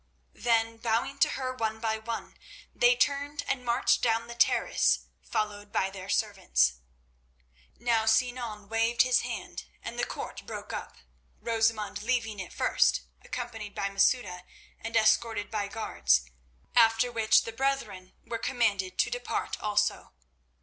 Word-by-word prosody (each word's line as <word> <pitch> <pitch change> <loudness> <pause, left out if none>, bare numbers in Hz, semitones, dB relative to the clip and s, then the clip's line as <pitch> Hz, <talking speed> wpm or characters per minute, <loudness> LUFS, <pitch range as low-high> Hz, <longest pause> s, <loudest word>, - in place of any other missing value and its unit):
Then, 230 -1 +1
bowing 235 +4 -1
to - - +5
her 255 -1 -3
one 220 -3 -2
by 220 -1 -1
one, 230 +1 -6 0.4
they - - +5
turned 285 -5 0
and 260 -2 -1
marched 240 +1 +2
down 230 -1 +1
the 235 - -8
terrace 235 - +3 0.2
followed 205 -1 -3
by 195 -1 0
their 190 0 -9
servants. 120 - +1 1.0
Now 230 -2 +1
Sinan 225 -2 0
waved 225 +2 +3
his 255 -1 +3
hand - - -6 0.2
and - - -6
the - - +1
court - - -5
broke - - -7
up, - - -6 0.4
Rosamund 225 -3 0
leaving 225 -3 -1
it 190 - -6
first, - - +2 0.2
accompanied 225 -4 -6
by 200 - -1
Masouda 195 -2 +1 0.4
and 225 +1 -2
escorted 220 -1 +2
by 210 -2 -1
guards, 65 - +1 0.5
after 225 +1 +5
which 225 -2 +4
the 225 - -5
brethren 225 -8 -2
were 230 - -4
commanded 205 -7 0
to - - +2
depart - - -3
also. 210 0 0
225 Hz, 140 wpm, -29 LUFS, 205-240 Hz, 1.0 s, to